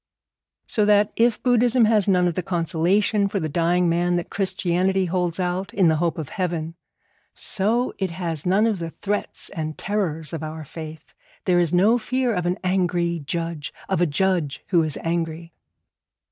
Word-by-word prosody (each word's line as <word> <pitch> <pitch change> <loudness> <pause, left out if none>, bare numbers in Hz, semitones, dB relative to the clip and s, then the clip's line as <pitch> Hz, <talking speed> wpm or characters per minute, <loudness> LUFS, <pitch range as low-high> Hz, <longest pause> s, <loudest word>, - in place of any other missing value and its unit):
So 215 - +1
that 205 0 +4
if 230 -1 +2
Buddhism 245 -1 +4
has 215 -2 +3
none 180 -2 +3
of 175 - 0
the 185 - -2
consolation 185 +4 +1
for 200 -1 -1
the 160 - -2
dying 175 +3 +1
man 175 +1 +1
that 175 - -3
Christianity 190 -1 +1
holds 180 -1 -1
out, 180 +1 -2
in 185 -4 +4
the 160 - +2
hope 170 -1 0
of 155 -4 -5
heaven, 170 -5 -3 0.6
so 220 +5 0
it 190 -2 0
has 165 -3 -4
none 195 +4 +3
of 215 -5 0
the 165 -1 -4
threats 205 +5 -3
and 155 -1 -5
terrors 170 -7 -2
of 160 - -4
our 155 0 -6
faith. 155 +1 -9 0.3
There 180 -2 +3
is 170 -3 +2
no 205 +7 +4
fear 255 +1 0
of 180 -3 -1
an 180 +2 0
angry 175 -2 0
Judge 165 -2 -3 0.2
of - - 0
a 175 - +4
Judge 165 -2 0
who 175 -4 +4
is 155 -3 -2
angry. 165 0 -3
175 Hz, 175 wpm, -23 LUFS, 165-200 Hz, 0.6 s, that